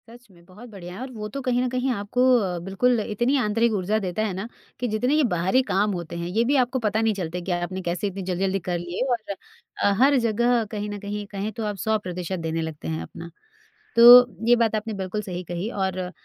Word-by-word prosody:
सच 240 0 -15
में 170 -2 -20
बहुत 210 +7 -13
बढ़िया 180 -4 -9
है, - - -8
और 260 0 -6
वो 210 -2 -5
तो 275 +6 -5
कहीं 250 -1 0
ना 255 - 0
कहीं 255 +1 -1
आपको 205 +3 -2 0.2
अ, 185 -6 -1
बिल्कुल 195 +7 +1
इतनी 240 +6 0
आंतरिक 230 -1 +1
ऊर्जा 205 +2 0
देता 190 0 -3
है 205 - -2
ना 190 +4 -5 0.3
कि 245 - -1
जितने 230 +5 0
ये 310 - +3
बाहरी 185 +9 +2
काम 205 -3 +1
होते 170 -2 -6
हैं, 170 0 -4
ये 215 +6 +1
भी 270 +5 +1
आपको 255 +2 -3
पता 220 -1 0
नहीं 225 -1 +2
चलते 180 -2 -4
क्या, 175 0 -1
आपने 185 +2 -4
कैसे 175 +2 -2
इतनी 195 0 -5
जल्दी-जल्दी 190 +1 -1
कर 175 - 0
लिए। 175 +1 -5
और 220 -4 -2 0.5
अ, 200 - +4
हर 280 +1 +5
जगह 235 +2 +2
कहीं 210 -1 -4
न 205 0 -5
कहीं 205 +1 -5
कहें 200 +1 -3
तो 220 +1 -5
आप 210 -1 -2
100% 185 -4 -2
देने 165 0 -2
लगते 160 - -6
हैं 80 0 -3
अपना, 165 - -9 0.7
तो 245 +1 +10 0.2
ये 240 - +7
बात 230 -2 +1
आपने 215 +1 -3
बिल्कुल 195 +1 -3
सही 185 -3 -6
कही। 175 +4 -4
और 190 -3 -2
अ, 180 -1 -4
205 Hz, 235 wpm, -24 LUFS, 180-235 Hz, 0.7 s, तो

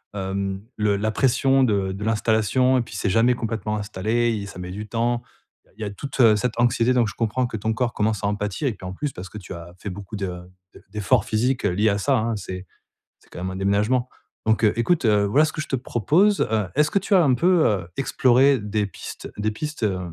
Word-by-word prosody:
hem, 95 0 -3
le 105 -1 +2
la 110 +2 -1
pression 135 +2 +3
de 100 -5 +1
de 100 +2 -6
l'installation 110 +4 +2
et - - +1
puis 115 -4 -8
c'est 95 - -1
jamais 115 +5 +3
complètement 110 -2 -3
installé 110 +4 0
et 100 - -6
ça 90 - -10
met 90 0 -6
du 105 +2 -6
temps. 120 +2 0 0.6
Il - - -12
y - - -2
a 100 - -3
toute 120 -1 +3
cette 115 +1 -2
anxiété 120 +1 +3
donc 120 -3 +3
je 105 - -6
comprends 120 +3 0
que 120 -2 -4
ton 110 +2 -1
corps 120 +1 -1
commence 105 -1 -1
à - - +1
en 105 - 0
pâtir 105 +7 -2
et 120 - 0
puis 95 - -12
en 95 - -5
plus 145 +7 -3
parce 90 +2 -9
que 105 - -9
tu 95 -1 -8
as 85 0 -10
fait 100 - -6
beaucoup 100 +3 -8
de 100 -2 -3 0.5
de - - -16
d'efforts 105 +2 +1
physiques 125 +4 0
liés 105 +5 +2
à 100 - +1
ça 135 +5 +2
hein, 115 0 -1
c'est 95 -2 -6 0.5
c'est - - -27
quand - - -9
même 95 - -3
un - - -6
déménagement, 105 +6 +1 0.4
donc 110 +1 +2
heu, 105 - +4
écoute, 155 +2 +1
heu, 105 -2 +4
voilà 140 +10 +4
ce 155 - -4
que 155 - -3
je - - -6
te - - 0
propose, 155 - +2
heu, 110 -3 +1
est-ce 150 +1 +3
que - - 0
tu 200 - -2
as 185 -3 +6
un 130 -4 +3
peu, 175 +3 +3
heu, 95 -5 -1
exploré 135 0 +4
des 105 0 -1
pistes - - -9
des 110 +1 0
pistes, 150 +2 -5
heu, 95 -3 +1
110 Hz, 245 wpm, -23 LUFS, 100-125 Hz, 0.6 s, as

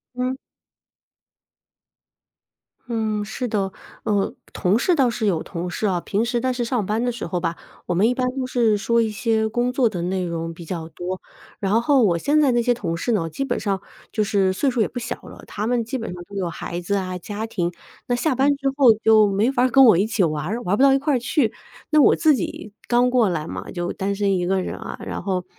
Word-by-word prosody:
嗯。 255 +1 -1 2.5
嗯， 220 -3 -1
是 220 +4 -4
的。 200 -4 -1 0.3
呃， 205 -2 0 0.2
同 185 +4 +1
事 355 +6 +2
倒 265 -5 +3
是 230 -1 -2
有 170 -5 +1
同 180 0 -5
事 195 - -3
啊， 180 -4 +1
平 205 +5 -1
时 240 0 0
但 260 +1 +1
是 245 -1 -2
上 235 -2 0
班 215 +4 -1
的 245 - +1
时 235 - -5
候 175 +1 -2
吧， 165 0 -2 0.3
我 180 - -1
们 195 +6 +3
一 250 - 0
般 255 0 0
都 260 -2 -2
是 230 -4 +2
说 235 +3 +1
一 220 -1 0
些 220 0 0
工 240 +3 0
作 250 -2 +2
的 180 -5 -4
内 185 +1 -1
容 165 -1 -4
比 170 0 -11
较 160 -1 -5
多， 180 +3 -5 0.4
然 210 +4 +2
后 270 0 +4
我 175 -5 +3
现 295 - +2
在 280 -3 +4
那 240 0 +2
些 245 +1 +3
同 180 -8 -3
事 240 - -1
呢， 175 -7 0
基 275 - -3
本 - - -1
上 195 -2 -1 0.3
就 215 - +1
是 195 -2 +2
岁 270 +8 +1
数 240 -2 0
也 - - +2
不 - - -10
小 240 - -3
了， - - -12
他 210 +1 -4
们 240 -1 +1
基 260 +4 -4
本 225 - -5
上 175 0 -8
都 200 +3 -13
有 185 -3 -1
孩 170 +1 -5
子 200 +4 -1
啊 185 -2 -2
家 210 +5 -5
庭， 175 -6 -2 0.4
那 245 - +1
下 265 +4 +1
班 275 +3 +3
之 275 -1 -1
后 270 -4 +7
就 220 -1 +6
没 210 +6 +2
法 250 - +1
儿 255 - +3
跟 270 +2 +7
我 220 -8 +7
一 195 - +3
起 220 - -4
就 - - +4
玩 150 -1 -3
儿， 215 +8 -2
玩 185 - 0
儿 - - +2
不 - - +1
到 275 -1 +7
一 - - +4
块 280 -2 +1
去。 240 -1 +1 0.4
那 305 -1 +6
我 - - +6
自 315 -2 +4
己 210 -1 -5
刚 245 +1 +3
过 240 -5 +3
来 160 -4 -2
嘛， - - -6
就 175 -1 -3
单 200 +1 -2
身 200 -1 +1
一 180 -1 0
个 190 0 +1
人 - - -4
啊， - - -7
然 - - -4
后 185 -1 -2
215 Hz, 265 characters per minute, -22 LUFS, 185-245 Hz, 2.5 s, 后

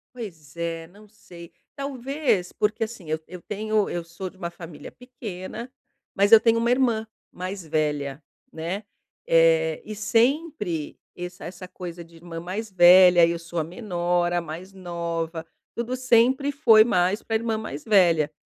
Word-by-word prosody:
Pois 165 - -9
é, 165 -1 -3
não 205 +4 -18
sei. 175 -5 -14 0.2
Talvez, 270 - -1
porque, 215 +1 0
assim, 215 -7 -7
eu 155 0 -1
eu 180 0 -10
tenho 215 +1 -1
eu 175 - -3
sou 170 +3 -7
de 190 - -22
uma 170 -2 -4
família 170 -3 -10
pequena, 235 -2 -8 0.4
mas 200 +2 +3
eu 225 - +11
tenho 230 +1 +3
uma 235 +1 +1
irmã 235 -4 +1 0.2
mais 185 +1 -6
velha, 150 -2 -1 0.3
né, 170 +6 -4 0.4
eh, 165 -1 +4
e 215 - -6
sempre 225 - 0 0.2
esse 180 0 -8
essa 180 +2 -8
coisa 175 -2 -8
de 165 0 -19
irmã 165 0 -8
mais 195 +6 -5
velha 180 -1 +7
e 170 - 0
eu 170 - -2
sou 170 0 -5
a - - 0
menor, 175 -1 -1
a 175 - +1
mais 170 +4 -8
nova, 170 -3 -4 0.3
tudo 240 +2 -2
sempre 255 +3 +3
foi 235 -7 +6
mais 185 -2 +1
pra 225 - -3
irmã 225 0 0
mais 215 -9 -6
velha, 170 -8 +4
185 Hz, 165 wpm, -25 LUFS, 170-220 Hz, 0.4 s, eu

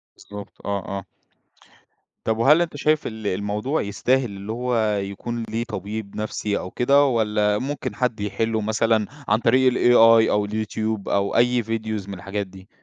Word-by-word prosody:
بالضبط، 100 0 -11
آه، 100 -2 -2
آه. 95 - -7 1.2
طب 110 0 0
وهل 150 +8 +5
أنت 170 -3 -2
شايف 155 +1 +1
ال 110 -2 -6
الموضوع 105 +9 -1
يستاهل 125 +6 +1
اللي 100 -1 -7
هو 115 -3 0
يكون 100 +4 -4
ليه 115 +2 -2
طبيب 105 -1 -6
نفسي 105 -1 -2
أو 90 - -6
كده 140 +3 +4
والّا 105 -4 +1
ممكن 140 +4 -4
حد 125 -4 -1
يحِلُّه 110 +2 -1
مثلًا 110 0 +1 0.2
عن 105 +1 +3
طريق 130 +2 +4
الAI 115 -2 +6
أو 105 0 +1
اليوتيوب 110 0 -3
أو 100 0 0
أي 120 0 +3
فيديوز 110 -2 -3
من - - -5
الحاجات 100 +2 -4
دي؟ 95 +1 -15
110 Hz, 160 wpm, -23 LUFS, 100-120 Hz, 1.2 s, الAI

